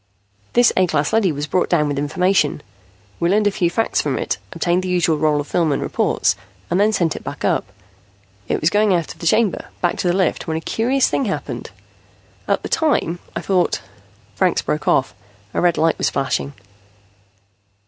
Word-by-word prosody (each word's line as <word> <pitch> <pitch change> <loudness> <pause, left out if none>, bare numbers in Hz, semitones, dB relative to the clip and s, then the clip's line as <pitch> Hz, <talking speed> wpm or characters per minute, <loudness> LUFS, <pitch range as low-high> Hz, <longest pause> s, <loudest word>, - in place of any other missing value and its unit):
"This 245 -1 +5
A 185 -1 +3
class 145 -3 0
leady 215 -5 +3
was 145 0 -3
brought 180 +3 0
down 155 -4 +2
with 145 -1 -2
information. 155 0 +1 0.6
We 170 - +1
learned 210 +3 +3
a 205 - +3
few 175 -3 +1
facts 225 +6 0
from - - -1
it, - - -2
obtained 175 +1 0
the 185 - -4
usual 170 -4 +2
roll 150 -1 +2
of 145 - -3
film 165 0 +1
and 140 - 0
reports, - - +1 0.4
and 180 - +2
then 210 +2 +4
sent 170 -6 0
it - - -8
back - - -5
up. - - 0 0.8
It - - 0
was 155 - +2
going 205 -2 +3
out 170 -3 -2
of - - -24
the 170 - -3
chamber, 215 +3 +2
back 175 - 0
to - - -1
the 175 - +2
lift, 185 -4 0
when 160 0 -1
a - - -4
curious 255 +8 +1
thing 275 - 0
happened. 195 - -4 0.8
At - - 0
the - - -3
time, 280 - +1 0.2
I - - -2
thought 185 -2 +1 0.3
" 100 0 -32
Franks 185 -2 +1
broke 150 0 -2
off. 135 - +2 0.4
A - - 0
red 175 -2 +2
light 160 0 +2
was - - +2
flashing. 140 +1 -2
175 Hz, 200 wpm, -20 LUFS, 155-195 Hz, 0.8 s, This